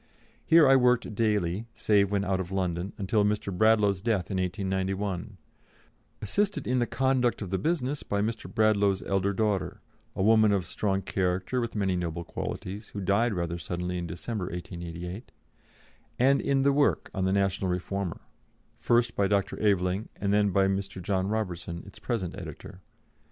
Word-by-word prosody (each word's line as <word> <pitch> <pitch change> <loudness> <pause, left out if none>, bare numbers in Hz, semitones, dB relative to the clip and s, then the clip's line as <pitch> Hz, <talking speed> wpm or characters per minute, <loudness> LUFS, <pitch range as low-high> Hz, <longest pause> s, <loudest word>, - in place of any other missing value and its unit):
Here 160 -3 +6
I 135 - +7
worked 125 -3 +3
daily, 105 -2 0
save 100 -2 +3
when 100 -1 0
out 95 -1 0
of 95 0 -4
London, 90 0 -1
until 105 +1 +1
Mr. 105 -2 -1
Bradlaugh's 105 -2 +3
death 105 -5 0
in 95 - -1
1891, 95 +1 -2 0.9
assisted 205 - 0
in 125 +1 +1
the 120 - +1
conduct 130 -3 +1
of 95 - -7
the 95 - 0
business 145 - -1
by 100 - -2
Mr. 110 +2 -3
Bradlaugh's 100 -3 +2
elder 95 0 0
daughter 105 -1 -1 0.4
a 95 - 0
woman 110 0 +5
of 95 -2 0
strong 95 -2 -1
character 95 +6 -1
with 115 -1 -4
many 95 -3 +1
noble 85 -1 -3
qualities, 100 +5 -6
who 105 - -7
died 100 +4 +1
rather 85 -1 -2
suddenly 90 +1 -3
in 85 - -4
December, 90 +4 -4
1888, 90 +3 -7 0.9
and 135 +3 +4
in 135 -1 +1
the 140 0 +4
work 145 0 +1
on 95 -1 -1
the 95 - +1
National 95 -1 +1
Reformer, 90 0 -3 0.6
first 120 -1 +2
by 100 - +2
Dr. 100 -1 0
Aveling, 100 0 +1
and 100 0 -1
then 105 0 +3
by 95 +1 +3
Mr. 95 -1 -2
John 95 +1 -1
Robertson, 90 -5 -3
its 100 - -13
present 100 -8 -3
editor. 95 +2 -9
100 Hz, 165 wpm, -28 LUFS, 95-110 Hz, 0.9 s, I